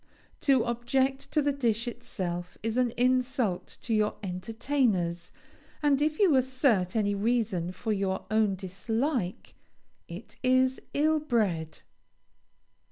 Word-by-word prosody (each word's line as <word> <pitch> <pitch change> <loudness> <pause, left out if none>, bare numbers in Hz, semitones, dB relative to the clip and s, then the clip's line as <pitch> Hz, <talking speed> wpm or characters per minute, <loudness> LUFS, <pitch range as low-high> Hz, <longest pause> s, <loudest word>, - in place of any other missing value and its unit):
To 265 -5 +3
object 265 +3 0
to 300 - +2
the 285 - +2
dish 235 -3 0
itself 175 -6 -5
is 225 0 -1
an 250 -1 +2
insult 250 -5 0
to 230 - -1
your 210 -1 +2
entertainers, 190 -2 -1 0.5
and 290 -1 +3
if 305 +1 +1
you 375 -8 +4
assert 255 -8 +2
any 205 -2 +2
reason 200 -5 0
for 215 +4 -2
your 195 -1 -1
own 215 -2 +3
dislike 200 - -2 0.5
it 175 +6 -10
is 255 0 +2
ill 310 +2 +3
bred. 200 - -1
230 Hz, 120 wpm, -28 LUFS, 190-260 Hz, 0.5 s, you